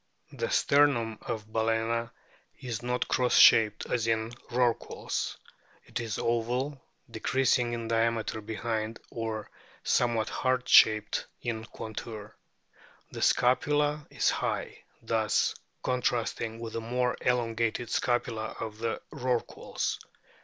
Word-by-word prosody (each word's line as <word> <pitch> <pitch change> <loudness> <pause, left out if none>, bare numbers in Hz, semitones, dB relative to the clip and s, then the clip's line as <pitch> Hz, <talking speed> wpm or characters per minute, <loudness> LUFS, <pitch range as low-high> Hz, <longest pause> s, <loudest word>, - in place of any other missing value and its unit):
The - - -3
sternum 120 -6 +3
of 110 -1 -5
Bal&na 115 +1 0 0.5
is 120 -3 -4
not 125 +1 -1
cross 125 -1 +2
shaped 110 -2 +6
as 115 -2 -1
in 110 0 0 0.2
Rorquals; 120 -1 -1 0.5
it - - -4
is 115 -3 -3
oval, 125 +4 -1 0.3
decreasing 125 +1 +1
in 115 -1 -3
diameter 115 -1 0
behind, 110 +1 -3
or 110 -2 -4 0.3
somewhat 115 -3 +2
heart 130 -1 0
shaped 110 -1 +5 0.2
in 115 -2 -3
contour. 110 -1 -7 0.8
The - - -6
scapula 145 +4 +2
is - - +2
high, - - -3 0.2
thus 110 -1 +1 0.3
contrasting 120 -2 -1
with 115 -1 -6
the 115 - -3
more 125 +2 0
elongated 115 -1 0
scapula 115 -2 -1
of 110 -1 -5
the 115 0 -2
Rorquals. 125 -4 -2
115 Hz, 110 wpm, -29 LUFS, 110-125 Hz, 0.8 s, shaped